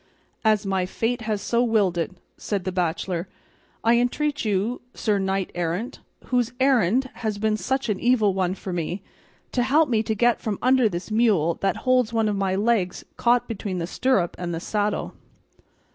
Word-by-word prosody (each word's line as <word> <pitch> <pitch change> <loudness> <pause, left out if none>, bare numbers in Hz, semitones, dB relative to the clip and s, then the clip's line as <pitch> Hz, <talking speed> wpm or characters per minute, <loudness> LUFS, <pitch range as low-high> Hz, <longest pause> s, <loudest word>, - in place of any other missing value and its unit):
"As 215 -2 +3
my 190 -2 0
fate 230 +5 -1
has 210 -2 -1
so 235 0 +1
willed 215 -7 +2
it," 165 -2 -1 0.3
said 200 -3 -3
the 185 - -2
bachelor, 180 0 -1 0.6
"I 230 +1 +4
entreat 290 +4 0
you, 215 +3 0
sir 210 -3 +1
knight 190 -1 -1
errant, 175 +9 -3 0.3
whose 245 -1 0
errand 260 -1 +3
has 215 -3 -3
been 215 +1 +1
such 265 +7 -1
an 205 -4 -1
evil 230 -5 +3
one 185 -1 0
for 190 -1 -6
me, 175 +3 -3 0.5
to 250 - +1
help 285 +4 +3
me 225 -3 +2
to 220 0 -2
get 240 +2 +2
from 210 -3 -2
under 255 -2 +4
this 175 +3 -5
mule 210 -8 +3
that 195 - +1
holds 255 -3 +3
one 225 -1 +2
of 210 - 0
my 195 -1 0
legs 205 -3 0
caught 245 0 +2
between 200 -4 -4
the 170 - -2
stirrup 195 -2 +1
and 175 -1 -3
the - - -3
saddle." 205 +3 -1
215 Hz, 180 wpm, -24 LUFS, 190-240 Hz, 0.6 s, I